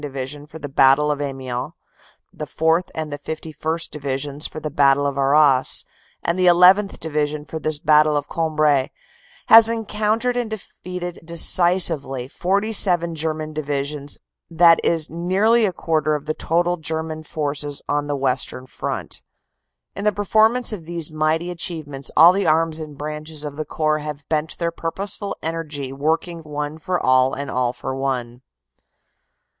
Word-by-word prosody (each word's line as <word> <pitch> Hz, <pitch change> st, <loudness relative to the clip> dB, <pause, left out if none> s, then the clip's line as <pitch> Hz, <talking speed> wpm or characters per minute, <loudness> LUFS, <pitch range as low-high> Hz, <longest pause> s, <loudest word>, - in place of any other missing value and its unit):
Division 145 Hz, +1 st, -6 dB
for 155 Hz, -, -11 dB
the 145 Hz, -2 st, -6 dB
Battle 135 Hz, +2 st, +4 dB
of 145 Hz, 0 st, -3 dB
Amiens, 130 Hz, -3 st, -4 dB, 0.6 s
the 150 Hz, -, -6 dB
4th. 160 Hz, +2 st, +1 dB
and 155 Hz, -2 st, -4 dB
the 145 Hz, -, -6 dB
51st. 160 Hz, +2 st, -5 dB
Divisions 140 Hz, 0 st, -2 dB
for -, -, -8 dB
the 155 Hz, -1 st, -5 dB
Battle 140 Hz, 0 st, +3 dB
of 140 Hz, -1 st, -1 dB
Arras, 140 Hz, -1 st, +3 dB, 0.4 s
and 170 Hz, +2 st, -1 dB
the 185 Hz, -, +4 dB
1 175 Hz, -, +7 dB
1th. 190 Hz, +3 st, +5 dB
Division 150 Hz, -1 st, -2 dB
for 160 Hz, -, -6 dB
this 155 Hz, 0 st, 0 dB
Battle 150 Hz, 0 st, +4 dB
of 145 Hz, -, -3 dB
Cambrai 155 Hz, -4 st, +1 dB, 0.6 s
has 225 Hz, 0 st, +9 dB
encoun 215 Hz, -1 st, -1 dB
tered 250 Hz, +1 st, -1 dB
and 240 Hz, -2 st, -2 dB
defeated 180 Hz, -4 st, -7 dB
decisively 165 Hz, -6 st, +2 dB
47 185 Hz, 0 st, +2 dB
German 155 Hz, -1 st, -3 dB
divisions 145 Hz, -1 st, -3 dB, 0.3 s
that 165 Hz, 0 st, +5 dB
is 165 Hz, -2 st, +1 dB
nearly 200 Hz, +7 st, +2 dB
a -, -, -1 dB
quarter 155 Hz, -3 st, 0 dB
of 150 Hz, -1 st, -6 dB
the 155 Hz, -, -1 dB
total 175 Hz, +3 st, 0 dB
German 160 Hz, 0 st, -4 dB
forces 145 Hz, -2 st, -4 dB
on 145 Hz, 0 st, -1 dB
the 145 Hz, -, -1 dB
Western 130 Hz, -1 st, -1 dB
front. -, -, -5 dB, 0.7 s
"In 200 Hz, -, -5 dB
the 210 Hz, -, +3 dB
performance 220 Hz, +4 st, +2 dB
of 175 Hz, -6 st, -7 dB
these 170 Hz, -2 st, -3 dB
mighty 155 Hz, +3 st, 0 dB
achievements 155 Hz, -6 st, -4 dB
all 170 Hz, +3 st, +8 dB
the 200 Hz, +1 st, 0 dB
arms 160 Hz, 0 st, +2 dB
and 150 Hz, -2 st, -8 dB
branches 150 Hz, +1 st, -6 dB
of 145 Hz, -1 st, -6 dB
the 155 Hz, +1 st, -4 dB
Corps 155 Hz, 0 st, 0 dB
have 150 Hz, -1 st, -7 dB
bent 155 Hz, 0 st, -1 dB
their 170 Hz, -1 st, -1 dB
purposeful 195 Hz, +5 st, -3 dB
energy 155 Hz, -5 st, -4 dB
working 160 Hz, +4 st, -1 dB
one 150 Hz, 0 st, -5 dB
for 180 Hz, +2 st, -2 dB
all 130 Hz, 0 st, +3 dB
and 140 Hz, +1 st, -5 dB
all 125 Hz, -1 st, 0 dB
for 130 Hz, -, -6 dB
one. 125 Hz, -3 st, -3 dB
155 Hz, 160 wpm, -21 LUFS, 145-170 Hz, 0.7 s, has